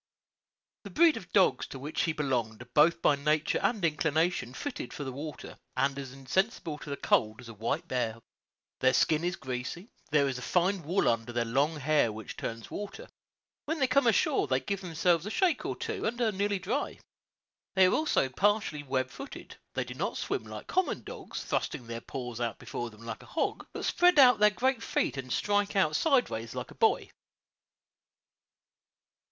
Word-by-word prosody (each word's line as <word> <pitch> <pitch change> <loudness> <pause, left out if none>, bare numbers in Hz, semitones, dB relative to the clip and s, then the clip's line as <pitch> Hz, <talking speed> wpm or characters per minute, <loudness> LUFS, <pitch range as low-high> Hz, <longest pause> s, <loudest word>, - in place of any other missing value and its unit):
The - - -8
breed 330 0 +5
of 180 - -9
dogs 190 -2 +3
to - - -8
which 145 +4 -3
he 165 - +1
belonged 125 -7 -2
are 125 - -24
both 165 +3 +4
by 145 - +5
nature 150 +2 +1
and 215 -7 +1
inclination 160 -3 0
fitted 285 - -5
for 145 - -5
the 135 - -4
water, 145 +4 -8 0.2
and 135 +1 +1
as 135 -2 -6
insensible 150 - -1
to - - -9
the 140 - -3
cold 110 +1 +2
as 120 -2 -10
a - - -8
white 110 +2 -2
bear. 115 -3 -1 0.6
Their 130 0 +4
skin 155 +4 +3
is 175 0 0
greasy; 130 - -5 0.2
there 145 -2 +3
is 130 -2 -2
a - - -8
fine 180 +7 +1
wool 175 +6 +1
under 115 +1 +1
their 120 0 0
long 140 +7 +1
hair 150 -4 +2
which 110 +1 -8
turns 115 0 -6
water; 205 - -6 0.6
when 320 +1 -2
they 265 - +4
come 255 0 +3
ashore 245 - +3
they 130 -1 +2
give 200 +6 -3
themselves 175 0 +1
a - - -2
shake 345 - +1
or - - -2
two 445 -1 -4
and 235 +2 -3
are 230 -3 +2
nearly 200 +1 0
dry. 220 +10 -2 0.8
They 190 -1 +7
are 185 - +3
also 310 - +2
partially 200 +1 +1
web 130 -2 -1
footed; 275 - -9 0.2
they - - 0
do - - -8
not - - -2
swim - - -2
like - - -8
common 370 0 0
dogs, - - -7
thrusting 125 - -2
their 115 0 -6
paws 125 -2 -6
out 115 -1 -1
before 120 - -5
them 110 +1 -14
like 115 -1 -6
a - - -14
hog, - - -2
but - - -5
spread 355 -1 +4
out 250 -6 +8
their 210 0 +7
great 250 +3 0
feet - - 0
and 130 -1 -5
strike 205 +4 +1
out 155 -6 +3
sidewise 245 - +1
like - - -5
a - - -10
boy. - - +2
155 Hz, 190 wpm, -30 LUFS, 130-205 Hz, 0.8 s, out